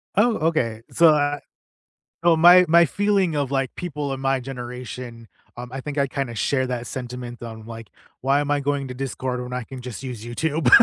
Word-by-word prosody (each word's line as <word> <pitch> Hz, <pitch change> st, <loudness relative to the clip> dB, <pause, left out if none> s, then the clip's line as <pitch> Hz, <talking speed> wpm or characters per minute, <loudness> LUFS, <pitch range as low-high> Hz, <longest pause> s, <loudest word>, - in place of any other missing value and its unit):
Oh, 225 Hz, +3 st, +4 dB
okay, 115 Hz, -9 st, 0 dB
so, 170 Hz, -1 st, +6 dB
uh 145 Hz, -1 st, +2 dB, 0.8 s
so, 170 Hz, -2 st, +5 dB
my 180 Hz, +2 st, +8 dB
my 170 Hz, +1 st, +7 dB
feeling 200 Hz, -1 st, +1 dB
of, 140 Hz, -3 st, 0 dB
like, 135 Hz, -2 st, -1 dB
people 150 Hz, -5 st, -4 dB
in 135 Hz, -, -5 dB
my 135 Hz, 0 st, +1 dB
generation, 125 Hz, -2 st, -7 dB, 0.3 s
um, 120 Hz, 0 st, -7 dB
I 135 Hz, -, -4 dB
think 150 Hz, +2 st, -6 dB
I 140 Hz, -, +3 dB
kinda 135 Hz, -3 st, -3 dB
share 130 Hz, +4 st, 0 dB
that 125 Hz, -1 st, -3 dB
sentiment 125 Hz, -1 st, -6 dB
on, 110 Hz, -2 st, -8 dB
like, 115 Hz, -1 st, -9 dB, 0.3 s
"Why 135 Hz, +2 st, +3 dB
am 145 Hz, 0 st, -2 dB
I 145 Hz, -, +2 dB
going 140 Hz, -1 st, -1 dB
to -, -, -5 dB
Discord 130 Hz, -1 st, -3 dB
when 125 Hz, 0 st, -6 dB
I 125 Hz, -1 st, -3 dB
can 130 Hz, +1 st, -9 dB
just 125 Hz, +1 st, -7 dB
use 125 Hz, -4 st, -6 dB
YouTube?" 145 Hz, +3 st, 0 dB
135 Hz, 200 wpm, -23 LUFS, 125-150 Hz, 0.8 s, my